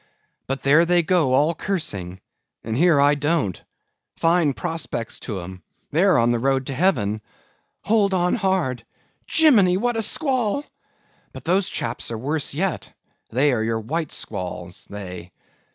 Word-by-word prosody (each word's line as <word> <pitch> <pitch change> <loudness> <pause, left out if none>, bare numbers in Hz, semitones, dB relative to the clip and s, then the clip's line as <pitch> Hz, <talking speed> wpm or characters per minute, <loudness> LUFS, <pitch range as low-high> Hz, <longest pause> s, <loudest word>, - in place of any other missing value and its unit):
But 135 +1 -3
there 150 +4 +5
they 175 0 +3
go, 160 -6 +2
all 150 +5 +3
cursing, 100 - -4 0.4
and 110 0 -3
here 165 +1 +4
I 145 +1 +5
don't. 145 - -1 0.6
Fine 165 -4 +2
prospects 160 -9 -4
to 100 -6 -5
'em; 90 +1 -9 0.3
they're 185 +5 +4
on 120 0 +3
the 120 - 0
road 135 +1 +1
to 135 - -4
heaven. 120 - +1 0.6
Hold 205 -2 +2
on 180 -1 +1
hard! 190 - 0 0.4
Jimmini, 215 - +5
what 240 +3 0
a - - +1
squall! 260 +1 0 0.7
But - - -10
those 185 +3 +2
chaps 115 +1 -3
there 115 - -2
are - - -6
worse 145 +3 -2
yet—they 150 - -2
are 115 - 0
your 115 0 -1
white 155 +8 -3
squalls, 90 -1 -5
they. 90 -3 -8
150 Hz, 150 wpm, -22 LUFS, 115-180 Hz, 0.7 s, there